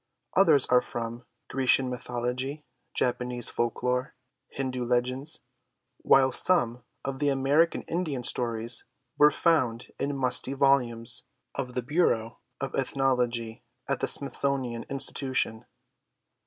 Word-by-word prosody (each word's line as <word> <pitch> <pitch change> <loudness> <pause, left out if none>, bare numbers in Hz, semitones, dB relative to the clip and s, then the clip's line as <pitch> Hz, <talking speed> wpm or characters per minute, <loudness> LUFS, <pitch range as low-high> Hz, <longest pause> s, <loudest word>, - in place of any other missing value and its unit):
Others 140 - +5
are 125 0 +4
from 115 +1 -6 0.2
Grecian 130 0 +2
mythology, 125 +3 -4 0.3
Japanese 125 -1 0
folk 120 0 -3
lore, 125 +1 -1 0.3
Hindoo 130 -2 -4
legends, 125 +5 -2 0.6
while 130 -1 +4
some 125 -6 +3 0.2
of 135 -1 -4
the 145 - +1
American 140 +5 +2
Indian 160 -7 -3
stories 115 -1 +2 0.4
were 150 - +8
found 130 -7 0
in 140 0 -2
musty 130 0 +2
volumes 125 -4 +1 0.3
of 125 -2 -5
the 125 - -2
Bureau 120 -6 0 0.2
of 135 -1 -4
Ethnology 125 -4 -1 0.3
at - - -1
the - - -1
Smithsonian 135 -4 +1
Institution. 130 -4 0
125 Hz, 115 wpm, -27 LUFS, 120-135 Hz, 0.6 s, were